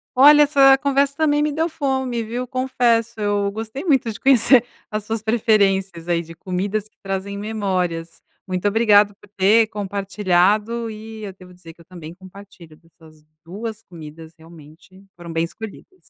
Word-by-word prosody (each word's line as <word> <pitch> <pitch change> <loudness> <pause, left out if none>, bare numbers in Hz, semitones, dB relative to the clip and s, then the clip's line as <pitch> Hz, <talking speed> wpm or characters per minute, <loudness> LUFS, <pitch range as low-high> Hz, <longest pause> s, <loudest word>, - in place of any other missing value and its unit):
Olha. 295 +3 +7
Essa 275 -2 +5
conversa 280 0 0
também 295 -2 +2
me 300 0 0
deu 320 +3 -1
fome, 265 -6 -2
viu 240 +3 -5
confesso. 240 -3 0
Eu 205 -1 0
gostei 220 +6 -6
muito 270 -9 +1
de 210 - -10
conhecer 260 -2 +5 0.3
as 215 0 -3
suas 220 0 -4
preferências 195 -6 +1
aí 170 -1 0
de 165 0 -12
comidas 195 +5 -3
que - - -39
trazem 195 +1 -4
memórias. 185 -6 -3 0.3
Muito 185 +1 -2
obrigado 205 -1 +3
por 200 - -21
ter 215 +4 +4
compartilhado 205 +2 0
e 220 0 -10
eu 200 -2 -7
devo 185 -1 -16
dizer 170 -2 -14
que 170 - -21
eu - - -19
também 170 -3 -11
compartilho 185 -3 -15
dessas 160 -2 -22 0.2
2 215 +5 -7
comidas 160 -2 -12
realmente 165 +3 -17
foram 170 -1 -10
bem 165 0 -1
escolhidas. 220 - -12
205 Hz, 160 wpm, -20 LUFS, 180-235 Hz, 0.3 s, Olha